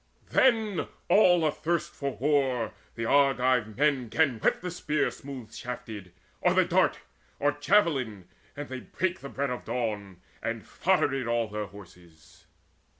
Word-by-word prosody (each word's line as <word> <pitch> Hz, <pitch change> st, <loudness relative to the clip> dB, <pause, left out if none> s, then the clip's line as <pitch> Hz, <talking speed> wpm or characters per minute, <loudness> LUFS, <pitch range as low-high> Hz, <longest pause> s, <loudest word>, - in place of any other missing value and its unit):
Then 220 Hz, -6 st, +3 dB, 0.2 s
all 175 Hz, -5 st, +5 dB
athirst 165 Hz, +2 st, -1 dB
for 140 Hz, -5 st, -4 dB
war 130 Hz, -4 st, +1 dB, 0.2 s
the 115 Hz, -, -3 dB
Argive 130 Hz, -5 st, +3 dB
men 135 Hz, -4 st, +2 dB
'Gan 140 Hz, -6 st, +2 dB
whet -, -, +1 dB
the 180 Hz, 0 st, -4 dB
spear 150 Hz, -4 st, 0 dB
smooth 130 Hz, -5 st, -9 dB
shafted, 110 Hz, -6 st, -7 dB, 0.3 s
or -, -, +3 dB
the -, -, +5 dB
dart, -, -, +2 dB, 0.4 s
Or 145 Hz, -, +2 dB
javelin, 145 Hz, -, +1 dB, 0.3 s
and 145 Hz, 0 st, -5 dB
they 130 Hz, 0 st, -5 dB
brake 185 Hz, +7 st, -2 dB
the 140 Hz, -, -8 dB
bread 140 Hz, 0 st, -2 dB
of 125 Hz, -, -4 dB
dawn, 105 Hz, -6 st, -3 dB, 0.2 s
And 115 Hz, -1 st, -3 dB
foddered 135 Hz, -9 st, +1 dB
all 115 Hz, -1 st, +1 dB
their 105 Hz, -1 st, -4 dB
horses. 90 Hz, -5 st, -16 dB
130 Hz, 145 wpm, -28 LUFS, 110-150 Hz, 0.4 s, all